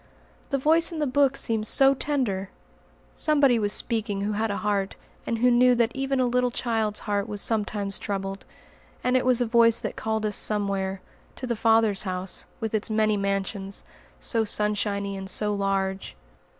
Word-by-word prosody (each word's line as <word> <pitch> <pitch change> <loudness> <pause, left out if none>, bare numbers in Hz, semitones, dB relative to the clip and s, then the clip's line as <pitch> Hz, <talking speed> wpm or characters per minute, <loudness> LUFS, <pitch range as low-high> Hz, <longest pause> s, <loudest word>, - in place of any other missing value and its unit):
The 275 - 0
Voice 320 +5 +3
in 330 - -6
the 300 - 0
Book 275 0 +2
seemed 220 -1 -2
so 270 +3 +4
tender! 245 -10 -2 0.6
Somebody 285 -6 +3
was 205 -1 0
speaking 220 -4 -1
who 205 +1 -1
had 215 +2 -1
a 200 - -2
heart, 200 -2 -1 0.3
and 230 - -1
who 245 +2 +3
knew 250 +1 +5
that 235 +1 0
even 270 0 -1
a 255 - +3
little 250 0 +1
child's 225 -3 -2
heart 205 0 -2
was 205 -1 -3
sometimes 205 -2 -1
troubled. 195 -1 -4 0.6
And 250 0 +1
it 255 0 +1
was 250 -1 +3
a - - +2
Voice 230 0 +4
that - - -4
called 220 -1 -2
us 210 -1 +1
somewhere; 195 -2 +1 0.3
to - - -6
the 240 -1 -2
Father's 225 -2 +3
house, 185 -1 -3
with 225 -1 -4
its 215 0 -1
many 215 -1 +2
mansions, 195 0 -3 0.3
so 230 -2 0
sunshiny 205 -1 -1
and 190 0 -6
so 210 +1 0
large. 195 - -2
215 Hz, 175 wpm, -25 LUFS, 200-245 Hz, 0.6 s, knew